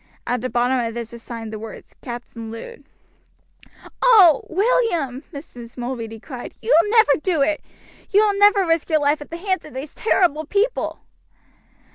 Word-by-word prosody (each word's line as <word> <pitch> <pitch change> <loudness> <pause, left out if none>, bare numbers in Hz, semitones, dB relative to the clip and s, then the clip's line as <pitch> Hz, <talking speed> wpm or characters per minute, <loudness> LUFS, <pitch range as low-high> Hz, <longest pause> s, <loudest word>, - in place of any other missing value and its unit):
At 245 -1 -1
the 255 - -3
bottom 250 +2 +1
of 230 -1 -3
this 235 -1 -5
was 235 -1 -10
signed 225 -2 -7
the 215 - -5
words 220 0 -10
"Captain 240 -2 -8
Lud." 460 - -10 1.2
"Oh! 395 - +7
William," 350 - +1
Mrs. 245 -5 -11
Mulready 235 -3 -5
cried, 250 0 -9
"you 475 - +2
will 415 - -4
never 440 -10 +5
do 330 -6 +1
it! 305 +1 0 0.5
You 415 +2 +4
will 405 -1 0
never 410 -1 +5
risk 330 -1 0
your 310 -1 +3
life 290 +1 +1
at 295 - -10
the 335 - -6
hands 375 +1 -2
of 305 - -13
these 275 +3 -6
terrible 330 -8 +1
people!" 415 +7 -1
295 Hz, 170 wpm, -21 LUFS, 240-385 Hz, 1.2 s, Oh